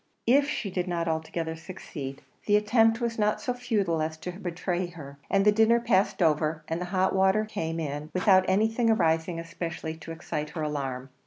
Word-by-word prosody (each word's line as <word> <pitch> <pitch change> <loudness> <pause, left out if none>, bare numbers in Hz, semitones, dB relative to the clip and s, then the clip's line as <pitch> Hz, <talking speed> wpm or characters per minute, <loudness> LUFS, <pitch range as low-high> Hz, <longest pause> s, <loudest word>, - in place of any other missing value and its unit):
If 280 +4 +4
she 210 -8 -3
did 180 0 -2
not 170 -1 -1
altogether 160 0 -2
succeed, 155 -5 -8 0.2
the 205 - +5
attempt 225 +2 +4
was 235 -2 -2
not 210 0 +2
so 250 - -2
futile 205 -10 0
as 160 0 -2
to 180 +3 -6
betray 180 0 -3
her; 140 -5 -11
and 195 0 +3
the 210 - +7
dinner 225 +2 +4
passed 200 -5 +2
over, 155 0 +1
and 165 +2 -2
the - - -2
hot 185 +1 +1
water 190 +3 +3
came 165 -6 -3
in, 150 -1 -4
without 185 0 +4
anything 220 +4 +2
arising 165 -4 +2
especially 165 -1 -5
to 165 +1 -9
excite 150 -2 -4
her 155 0 -4
alarm. 135 -3 -3
175 Hz, 185 wpm, -27 LUFS, 160-210 Hz, 0.2 s, the